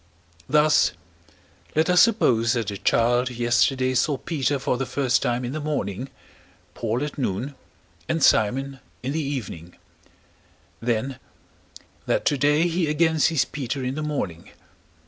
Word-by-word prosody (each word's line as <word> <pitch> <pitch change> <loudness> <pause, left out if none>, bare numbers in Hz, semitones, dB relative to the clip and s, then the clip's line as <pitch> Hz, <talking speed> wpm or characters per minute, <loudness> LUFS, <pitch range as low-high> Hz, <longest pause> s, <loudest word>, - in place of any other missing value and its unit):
Thus, 150 -10 +4 0.8
let 155 +1 +3
us 180 -1 +5
suppose 120 - +3
that 115 -4 -2
a 100 - -5
child 120 +2 +2
yesterday 125 +2 +1
saw 140 +3 +1
Peter 145 -1 -1
for 130 - -1
the 130 +1 -3
first 130 -3 +1
time 120 +1 -1
in 120 - -4
the 155 - -4
morning, 135 -6 -3 0.6
Paul 115 +3 -2
at 150 0 -5
noon, 125 +3 -2 0.6
and 165 -3 0
Simon 135 +5 +2 0.2
in 130 - -2
the 160 +2 -1
evening; 110 - -5 1.1
then, 120 +3 -2 0.9
that - - 0
today 150 +3 +3
he 170 -1 0
again 160 +1 +2
sees 150 -4 +3
Peter 135 0 -4
in 125 +1 -2
the 155 - -4
morning. 105 - -4
135 Hz, 140 wpm, -24 LUFS, 120-150 Hz, 1.1 s, us